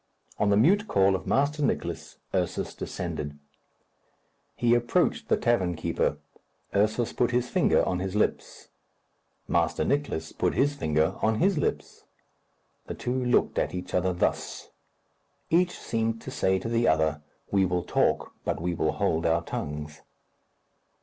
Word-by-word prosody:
On 105 - +2
the 100 - +4
mute 200 - +4
call 95 0 +3
of 95 - -5
Master 145 +2 +1
Nicless, 145 - -2 0.2
Ursus - - -1
descended. 75 -4 -5 1.2
He 120 -1 +2
approached 120 0 +1
the - - +3
tavern 95 -8 +1
keeper. 80 - -1 0.6
Ursus 110 +3 +1
put 120 - +1
his 125 0 0
finger - - +3
on 90 - 0
his 95 +1 -3
lips. 105 - -1 0.8
Master - - +1
Nicless 140 - -1
put - - 0
his 145 +1 +2
finger 80 - 0
on 110 0 +2
his 185 - +2
lips. - - -3 0.8
The - - -5
two 125 +1 -2
looked 125 0 +2
at - - -1
each 90 - -6
other 90 +1 +2
thus. 90 - -2 0.8
Each 175 +2 +3
seemed 115 0 -2
to - - -7
say 95 0 +1
to 95 - -5
the 115 0 +1
other, 80 -1 +2 0.3
"We 95 -1 +3
will 90 0 -1
talk, - - 0
but - - -2
we 85 +2 -1
will 80 -2 0
hold 85 -6 0
our 85 +1 +2
tongues." 75 -1 -5
100 Hz, 150 wpm, -27 LUFS, 85-120 Hz, 1.2 s, the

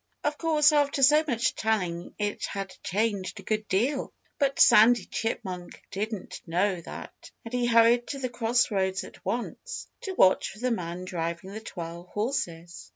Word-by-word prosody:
Of 295 0 0
course, 310 -2 +4
after 285 -2 +2
so 300 +4 +6
much 240 -2 +1
telling 180 -6 -2
it 205 -1 -2
had 195 -1 -5
changed 200 -1 -1
a - - -10
good 215 +1 -2
deal. 255 +9 0 0.3
But 275 -2 +1
Sandy 220 -1 +7
Chipmunk 185 -6 -4
didn't 210 0 -4
know 180 +2 +1
that. - - -10 0.2
And 230 - -8
he 245 -1 +1
hurried 235 +1 +5
to 280 - -4
the 265 -2 -2
cross 240 -1 +1
roads 190 -2 0
at - - -13
once, 245 - -4
to 380 -1 -5
watch 185 - +4
for - - -12
the 250 +3 -1
man 180 -4 -3
driving 170 +1 -4
the 215 +2 -7
twelve 170 -3 -7
horses. 175 -7 -3
215 Hz, 165 wpm, -27 LUFS, 185-245 Hz, 0.3 s, Sandy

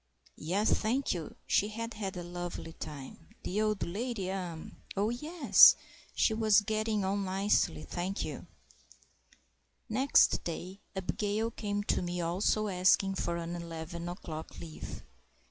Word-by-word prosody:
Yes, 195 +7 +1
thank 250 +5 +1
you; 170 -4 -6
she 205 - +3
had 230 +2 -5
had 195 -3 -4
a 175 - -4
lovely 175 -1 -6
time. 150 +1 -9
The 205 +4 -1
old 215 -2 +1
lady?—er—oh, 195 -2 -3
yes! 300 +4 +7 0.4
she 220 - +3
was 220 -1 +5
getting 215 -1 0
on 200 +1 0
nicely, 190 - +1
thank 180 - -3
you. - - -7 1.4
Next 260 +5 +4
day, 180 +3 -5 0.2
Abigail 210 +4 -1
came 205 -2 -2
to - - +1
me, 175 0 -3
also 185 +5 +1
asking 190 +1 +3
for 170 -2 -2
an 170 0 -4
eleven 170 0 -6
o'clock 160 -3 -7
leave. 75 - -8
190 Hz, 130 wpm, -31 LUFS, 170-215 Hz, 1.4 s, yes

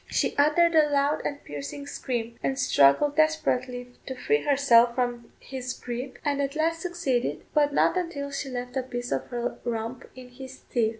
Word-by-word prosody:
She - - 0
uttered 305 +4 +4
a 310 -2 +5
loud 285 +1 +1
and 285 0 -4
piercing 145 - -7
scream, 235 -5 -4
and 270 - -1
struggled 265 - +4
desperately 255 -6 +1 0.2
to 260 - -4
free 440 - +1
herself 245 -5 +4
from 245 -2 -2
his 255 -1 -5
gripe, 250 +2 -6
and 285 -1 +1
at 275 +1 -2
last 330 +1 0
succeeded, 340 -9 -1
but 290 -1 +3
not 285 - +3
until 330 -6 -3
she 275 0 -4
left 250 0 -5
a 265 - +1
piece 245 -1 -5
of - - -1
her 240 -1 -3
rump 230 +1 -4
in 255 -1 -11
his 260 +1 -11
teeth. 230 -3 +2
265 Hz, 180 wpm, -26 LUFS, 245-290 Hz, 0.2 s, a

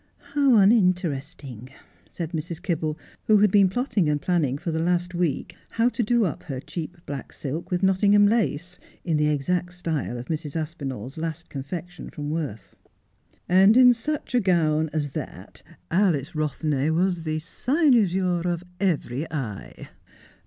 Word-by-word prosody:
' - - -41 0.2
How 280 -4 +4
uninteresting! 165 - +1 0.2
' - - -32
said 170 -2 -5
Mrs. 165 0 -4
Kibble, 160 -4 -2 0.3
who 215 - +6
had 205 -1 +4
been 200 -2 +5
plotting 205 - 0
and 150 -1 +1
planning 145 -5 0
for 165 - -4
the 160 - -1
last 175 +1 0
week 170 -5 -2
how 230 +2 +2
to 250 - -2
do 235 0 +2
up 165 - -3
her 135 -4 -6
cheap 170 +5 -6
black 140 -2 -6
silk 150 +4 -5
with 180 +1 -1
Nottingham 200 +2 +5
lace 180 -5 0 0.3
in 165 -4 +1
the 150 0 +2
exact 175 +5 -1
style 160 -8 -3
of 120 - -6
Mrs. 155 -1 -4
Aspinall's 140 -5 -5
last 165 +1 -5
confection 170 +5 -7
from 150 -1 -5
Worth. 145 - -5 0.4
' - - -43 0.2
And 195 +5 +6
in 250 -1 +8
such 280 +6 -4
a 250 - +4
gown 160 -6 +2
as 145 -3 -2
that - - -8 0.3
Alice 170 -8 +2
Eothney 150 -1 -1
was 175 +1 +1
the 155 -1 -2
cynosure 190 - +2
of 170 0 -3 0.2
every 155 -6 -1
eye. 120 -10 -6
170 Hz, 160 wpm, -25 LUFS, 150-190 Hz, 0.4 s, in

